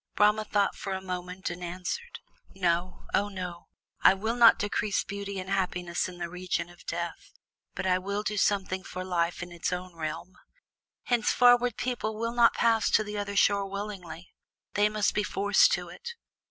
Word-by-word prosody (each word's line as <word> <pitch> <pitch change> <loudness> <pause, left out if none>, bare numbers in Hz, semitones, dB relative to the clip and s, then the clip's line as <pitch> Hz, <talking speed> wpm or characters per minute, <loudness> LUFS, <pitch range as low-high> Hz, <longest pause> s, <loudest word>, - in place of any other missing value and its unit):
Brahma 210 +1 +4
thought 205 -1 +1
for 195 - -4
a 190 - -2
moment 180 0 -5
and 175 +1 -7
answered: 185 - -5 0.3
"No! 180 -1 -1
Oh 205 +1 +2
no! 180 -3 -6 0.3
I - - +7
will 220 +4 -2
not 235 -2 +7
decrease 205 0 0
beauty 200 0 -5
and 185 - -6
happiness 180 -3 -1
in 180 - -10
the 175 -1 -3
region 180 -1 -3
of 175 - -18
Death, 175 - -5 0.4
but - - -3
I 185 -1 +3
will 200 +2 -3
do 210 0 -2
something 195 -2 +1
for 185 -1 -6
Life 175 -1 -1
in 175 - -9
its 175 +1 -3
own 180 -1 -5
realm. 165 +3 -5 0.7
Henceforward 245 0 +4
people 235 -4 -2
will 230 +1 -2
not 235 -1 +5
pass 225 -2 +3
to 215 - +4
the 210 0 -5
other 200 0 -4
shore 200 0 +3
willingly, 190 -4 -7 0.4
they 205 +1 +3
must 210 -1 +1
be 210 - +1
forced 205 - +3
to - - -2
it." 470 0 -8
195 Hz, 180 wpm, -28 LUFS, 180-210 Hz, 0.7 s, I